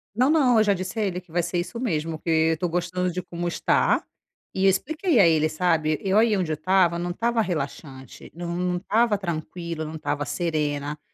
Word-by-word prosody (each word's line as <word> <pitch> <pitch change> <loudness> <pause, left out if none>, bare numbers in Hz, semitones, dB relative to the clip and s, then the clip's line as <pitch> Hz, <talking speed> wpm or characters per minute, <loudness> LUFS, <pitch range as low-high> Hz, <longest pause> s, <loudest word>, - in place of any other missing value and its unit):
Não, 255 +4 +3
não, 275 -7 +4
eu - - +5
já 205 -1 +3
disse 185 +4 -4
a - - +1
ele 185 -2 -2
que 175 -3 -23
vai 175 0 0
ser 175 +1 -2
isso 230 +7 -5
mesmo, 165 -9 -2
porque 165 - -6 0.2
eu - - -4
tô 180 - -1
gostando 180 +1 -1
de 180 +1 -3
como 175 0 -5
está, 170 - +1 0.5
e 190 0 0
eu - - +7
expliquei 310 - +1
a 185 - +7
ele, 155 -1 +3
sabe. 155 -2 0
Eu 195 +1 +1
aí 220 -1 +4
onde 180 -5 -1
eu 155 - 0
estava 175 +1 +2
não 175 +1 -3
estava 230 +4 0
relaxante, 140 - -6
não 175 +1 -2
estava 215 +3 +1
tranquila, 170 -2 -5
não 155 +1 -7
estava 150 -2 -2
serena, 150 -3 -2
175 Hz, 210 wpm, -24 LUFS, 160-195 Hz, 0.5 s, eu